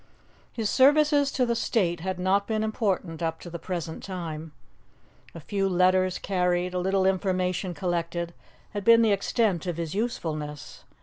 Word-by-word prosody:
His 225 -3 -2
services 290 +3 +4
to 255 - +2
the 235 -1 0
state 185 -7 0
had 185 +2 -3
not 190 +2 +1
been 220 -1 0
important 195 -6 -1
up 165 -1 -2
to 175 - -9
the 170 - -6
present 170 -3 -5
time. 165 -4 -6 0.8
A - - -6
few 195 +4 -1
letters 185 0 +3
carried, 180 -1 0
a 180 - 0
little 190 +1 +1
information 185 -1 0
collected, 170 -1 -2 0.4
had 205 -2 -4
been 230 +1 +6
the 220 - +3
extent 200 -3 +1
of 175 -2 -2
his 165 -2 -3
usefulness. 155 - -4
185 Hz, 160 wpm, -26 LUFS, 170-210 Hz, 0.8 s, been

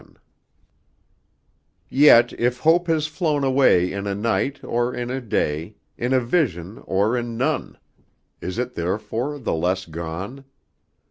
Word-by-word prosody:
XI - - -19 1.8
Yet 125 -4 +6
if 125 +1 +1
Hope 170 +3 +4
has 160 -2 +1
flown 155 -2 -1
away 130 -10 +4
In 100 +1 -4
a 100 - -1
night, 115 +6 -1
or 120 +1 0
in 120 0 -4
a 130 +1 -3
day, 85 -4 -2 0.2
In 120 +2 -2
a 130 - +4
vision, 115 - -1
or 100 +5 +1
in 120 -1 -3
none. 130 - -1 0.6
Is 90 +4 -5
it 125 +1 -2
therefore 110 - -3
the 130 - -2
less 90 +3 0
gone? 85 +11 -6
120 Hz, 140 wpm, -22 LUFS, 95-135 Hz, 1.8 s, Yet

